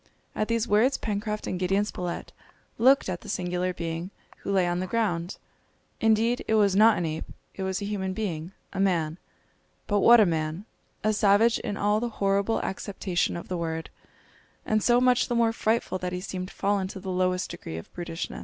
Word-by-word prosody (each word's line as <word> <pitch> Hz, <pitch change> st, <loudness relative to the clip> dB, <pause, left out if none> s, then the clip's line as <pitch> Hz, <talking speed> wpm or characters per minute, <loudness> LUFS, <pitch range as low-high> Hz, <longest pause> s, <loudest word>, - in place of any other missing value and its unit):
At 215 Hz, -, -1 dB
these 230 Hz, 0 st, 0 dB
words 225 Hz, +6 st, +3 dB
Pencroft 210 Hz, 0 st, -3 dB
and 180 Hz, -, -3 dB
Gideon 195 Hz, +3 st, +1 dB
Spilett 180 Hz, -4 st, -5 dB, 0.5 s
looked 265 Hz, +4 st, +5 dB
at 180 Hz, -2 st, -3 dB
the -, -, -10 dB
singular 180 Hz, 0 st, -1 dB
being 170 Hz, 0 st, -4 dB, 0.3 s
who -, -, -5 dB
lay 190 Hz, -2 st, +3 dB
on 175 Hz, 0 st, 0 dB
the 185 Hz, -, -2 dB
ground. 185 Hz, -5 st, -1 dB, 0.6 s
Indeed 225 Hz, +2 st, +2 dB
it 220 Hz, -, +2 dB
was 200 Hz, -3 st, +4 dB
not 220 Hz, +2 st, +6 dB
an 175 Hz, -, -1 dB
ape, 160 Hz, 0 st, -3 dB, 0.3 s
it -, -, -7 dB
was 190 Hz, +1 st, -2 dB
a -, -, -2 dB
human 190 Hz, -2 st, -2 dB
being, 180 Hz, -5 st, -4 dB, 0.2 s
a 195 Hz, -, -4 dB
man. 170 Hz, -4 st, +1 dB, 0.7 s
But 205 Hz, -1 st, +1 dB
what 235 Hz, +3 st, +7 dB
a 215 Hz, -, +7 dB
man! 160 Hz, +2 st, -2 dB, 0.4 s
A 215 Hz, +1 st, +2 dB
savage 215 Hz, +2 st, +4 dB
in 205 Hz, -, -4 dB
all 210 Hz, +1 st, +2 dB
the 240 Hz, +1 st, -2 dB
horrible 200 Hz, +2 st, +1 dB
acceptation 190 Hz, -3 st, -2 dB
of 170 Hz, -, -8 dB
the 180 Hz, -, -3 dB
word, 165 Hz, -1 st, -4 dB, 0.7 s
and 215 Hz, 0 st, +1 dB
so 240 Hz, +2 st, +4 dB
much 250 Hz, 0 st, +3 dB
the 240 Hz, -, -1 dB
more 230 Hz, -1 st, +3 dB
frightful 220 Hz, -4 st, 0 dB
that 180 Hz, 0 st, -3 dB
he 180 Hz, -, -2 dB
seemed 185 Hz, 0 st, -5 dB
fallen 200 Hz, -1 st, 0 dB
to 190 Hz, -, -8 dB
the 190 Hz, 0 st, -5 dB
lowest 185 Hz, 0 st, 0 dB
degree 80 Hz, -, -7 dB
of 80 Hz, -, -10 dB
brutishness! 170 Hz, -1 st, -5 dB
195 Hz, 195 wpm, -27 LUFS, 180-215 Hz, 0.7 s, what